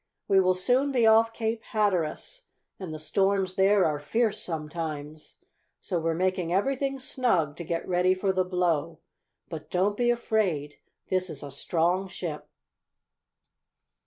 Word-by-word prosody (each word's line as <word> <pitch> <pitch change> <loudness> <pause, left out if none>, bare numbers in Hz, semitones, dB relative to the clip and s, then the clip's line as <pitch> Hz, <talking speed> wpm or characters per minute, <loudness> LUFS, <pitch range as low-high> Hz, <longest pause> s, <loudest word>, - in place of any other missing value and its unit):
"We 195 - +5
will 185 -1 +3
soon 250 +9 +2
be 245 -4 +3
off 225 +1 +5
Cape 225 0 -2
Hatteras, 205 - -1 0.4
and 185 -4 -6
the 155 - -5
storms 195 +3 0
there 195 +1 +4
are 150 -2 0
fierce 215 +7 0
sometimes. 155 -2 -6 0.4
So 180 -4 -2
we're 165 0 -1
making 185 -1 0
everything 270 +8 0
snug 210 - 0
to 170 - -5
get 165 0 -3
ready 180 +1 +2
for 190 +1 0
the 185 0 +2
blow. 180 -4 0 0.5
But - - -8
don't 195 +3 +1
be 240 +2 +1
afraid. 200 -11 0 0.3
This 185 -1 +1
is 145 -3 -6
a 140 - -7
strong 175 +6 0
ship." 165 -5 -6
185 Hz, 145 wpm, -27 LUFS, 165-215 Hz, 0.5 s, We